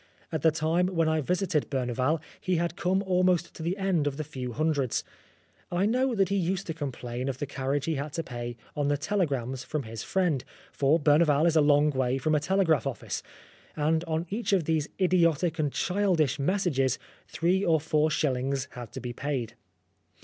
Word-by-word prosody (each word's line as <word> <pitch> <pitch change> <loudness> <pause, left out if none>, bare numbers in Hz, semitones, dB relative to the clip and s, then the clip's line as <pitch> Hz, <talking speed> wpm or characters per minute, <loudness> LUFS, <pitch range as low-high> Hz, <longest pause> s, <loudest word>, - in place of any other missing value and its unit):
At 160 -3 -2
the 160 - +5
time 160 +3 +1
when 165 -3 +1
I 160 0 +2
visited 180 0 0
Berneval, 130 +3 0 0.2
he 185 -1 0
had 170 0 -1
come 190 +3 +1
almost 180 -2 +2
to - - -10
the 170 +4 -1
end 190 -6 +1
of 140 -1 -2
the 155 - -2
few 130 -4 -6
hundreds. 145 -2 0 0.7
I 175 +2 +1
know 250 +3 +1
that 195 -3 +2
he 200 - +1
used 185 +1 -1
to 165 - -3
complain 130 -4 -4
of 130 - -3
the 145 - -3
carriage 140 0 -2
he 165 - 0
had 145 +1 -3
to 165 - -2
pay 120 -3 -6 0.2
on 145 -1 0
the 145 0 +2
telegrams 140 - -1
from 150 -3 -3
his 115 -1 -7
friend, 175 -7 0 0.3
for 145 +4 +2
Berneval 150 0 +4
is 165 -1 +3
a 155 - +6
long 145 +1 +4
way 130 -1 0
from 155 +4 0
a 150 - +4
telegraph 165 - +2
office, - - -4 0.5
and 160 +2 +1
on 160 +1 -1
each 210 0 -1
of 185 -4 +3
these 155 -1 0
idiotic 170 -3 +2
and 150 -2 +1
childish 175 -7 +1
messages 140 -6 +1 0.3
three 180 +4 +1
or 165 -4 +3
four 155 0 +1
shillings 135 -3 0
had 120 -3 -8
to - - -5
be 125 -1 -5
paid. 135 -3 -3
155 Hz, 195 wpm, -28 LUFS, 135-175 Hz, 0.7 s, a